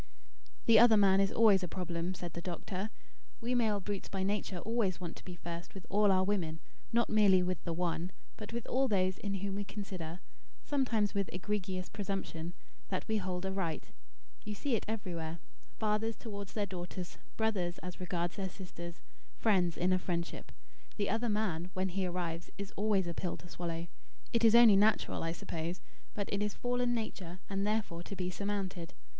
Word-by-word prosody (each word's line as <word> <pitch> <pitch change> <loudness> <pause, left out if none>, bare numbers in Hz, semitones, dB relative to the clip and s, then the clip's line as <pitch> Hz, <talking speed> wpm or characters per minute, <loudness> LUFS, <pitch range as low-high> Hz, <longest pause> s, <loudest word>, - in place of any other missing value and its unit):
"The 225 -2 +8
'other 230 -2 +8
man' 195 -1 +6
is 195 0 +3
always 215 -4 +6
a 180 - -1
problem," 175 0 -2
said 175 -2 -6
the 170 - -4
doctor. 185 +3 -3 0.5
"We 245 0 -1
male 220 -4 +3
brutes, 200 0 -4
by 190 -1 -1
nature, 200 -1 0
always 210 -2 0
want 175 -2 -5
to - - -12
be 180 - -7
first 170 +1 -7
with 190 - -8
all 205 0 +5
our 185 0 +4
women; 180 -5 0 0.3
not 235 +1 +3
merely 200 -4 +6
with 180 -1 -1
the 170 - -1
one, 175 +1 -1 0.2
but 210 0 -7
with 235 0 -3
all 265 +1 +2
those 190 -4 +2
in 200 -1 -2
whom 195 0 -2
we 205 +1 -1
consider, 185 -5 -5 0.4
sometimes 235 -8 +1
with 200 -2 0
egregious 185 -1 -2
presumption, 190 -4 -3 0.3
that 185 - -2
we 220 - +2
hold 185 -2 -2
a 190 - 0
right. 190 -5 -2 0.5
You 210 0 -4
see 270 +5 -1
it 215 - -2
everywhere, 170 -7 -3 0.4
fathers 215 +1 +1
towards 200 -4 -7
their 210 -2 0
daughters, 180 -1 -6 0.2
brothers 195 -6 +1
as 180 -1 -6
regards 175 0 -2
their 190 -1 -1
sisters, 170 -2 -8 0.4
friends 180 -7 +3
in 185 +1 +3
a 185 - +3
friendship. 170 -1 -3 0.5
The 205 -2 +1
'other 225 +2 +1
man,' 185 -5 0
when 185 0 +1
he 185 +1 0
arrives, 175 -1 -3
is 200 -1 -5
always 205 -2 +2
a 170 - -2
pill 175 +1 -2
to 175 - -12
swallow. 170 -1 -3 0.5
It 230 0 +3
is 225 0 +8
only 235 -4 +9
natural, 210 +2 +3
I 165 - 0
suppose; 170 +1 -4 0.4
but 200 -2 -1
it 200 - +1
is 210 -1 0
fallen 245 0 +1
nature 185 -6 -4
and 195 0 0
therefore 210 -6 0
to 200 - -6
be 180 -1 -2
surmounted. 190 -3 -3
190 Hz, 185 wpm, -34 LUFS, 175-210 Hz, 0.5 s, only